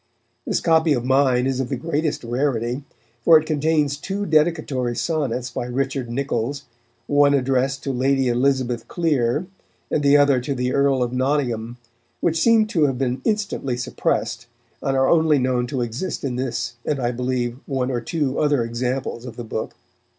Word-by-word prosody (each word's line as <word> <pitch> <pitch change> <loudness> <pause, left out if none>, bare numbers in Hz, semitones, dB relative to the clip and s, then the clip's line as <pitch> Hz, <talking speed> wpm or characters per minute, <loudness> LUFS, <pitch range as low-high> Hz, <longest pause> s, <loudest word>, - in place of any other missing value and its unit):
This - - 0
copy 160 -2 +3
of 120 -3 -2
mine 130 -1 +3
is 135 -1 -1
of 130 -2 -2
the - - -1
greatest 155 +2 -2
rarity, 120 0 -1 0.4
for 165 +3 +8
it 155 - -7
contains 150 -2 +1
two 195 +6 -3
dedicatory 150 -7 +1
sonnets 125 -3 -2
by 120 - -3
Richard 135 0 -2
Niccols, 140 +1 -2 0.4
one 145 +1 +4
addressed 135 0 0
to 135 - -2
Lady 135 +1 +1
Elizabeth 125 -1 0
Clere 150 -3 0 0.5
and 150 - +1
the 145 0 +5
other 145 -2 +4
to 135 +3 -3
the 125 0 -1
Earl 140 -2 +2
of 120 0 -3
Nottingham, 125 -3 -1 0.4
which 165 -1 +1
seem 230 -2 +5
to 160 -7 +2
have 135 -2 -2
been 130 -1 -1
instantly 200 - -1
suppressed, 125 - -2 0.3
and 135 -1 0
are 135 0 +3
only 160 -3 +4
known 125 -2 0
to 130 0 -2
exist 120 +10 -3
in 130 -3 -2
this 125 -1 -3
and, 145 - -1
I 120 -1 0
believe, 125 0 -2
one 135 -2 -1
or 120 -2 -1
two 140 0 -1
other 145 -5 +2
examples 125 +1 -3
of 120 -3 -8
the 120 - -6
book. 110 -1 -5
135 Hz, 170 wpm, -22 LUFS, 125-145 Hz, 0.5 s, for